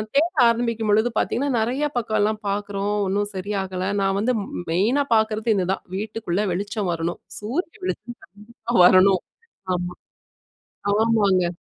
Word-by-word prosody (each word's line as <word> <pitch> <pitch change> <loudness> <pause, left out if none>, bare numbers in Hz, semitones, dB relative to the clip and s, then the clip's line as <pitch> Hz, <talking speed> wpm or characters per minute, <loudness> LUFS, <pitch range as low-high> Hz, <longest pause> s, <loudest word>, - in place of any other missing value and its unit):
தேட 325 +5 +3 0.2
ஆரம்பிக்கும்பொழுது 230 -1 +1
பாத்தீங்கன்னா, 280 +4 0
நிறைய 255 +6 0
பக்கம்லாம் 215 -2 0
பாக்குறோம் 205 0 -2
ஒண்ணும் 205 +2 0
சரியாகல. 190 -1 -3
நான் 195 0 +1
வந்து 250 +3 +1
மெ - - -8 0.2
மெயினா 230 +12 +2
பாக்குறது 220 +1 +1
இதுதான். 190 0 -1
வீட்டுக்குள்ள 210 -2 -2
வெளிச்சம் 200 +1 -2
வரணும். 170 +1 -3 0.2
சூரிய 270 - -3
வெளிச்சம் 210 +6 -5 0.3
கண்டிப்பா 235 0 -6
வரணும். 185 0 +6 0.5
ஆமா. 180 0 -3 1.0
ஆமாங்க. 200 -6 +2
210 Hz, 120 wpm, -23 LUFS, 190-230 Hz, 1.0 s, வரணும்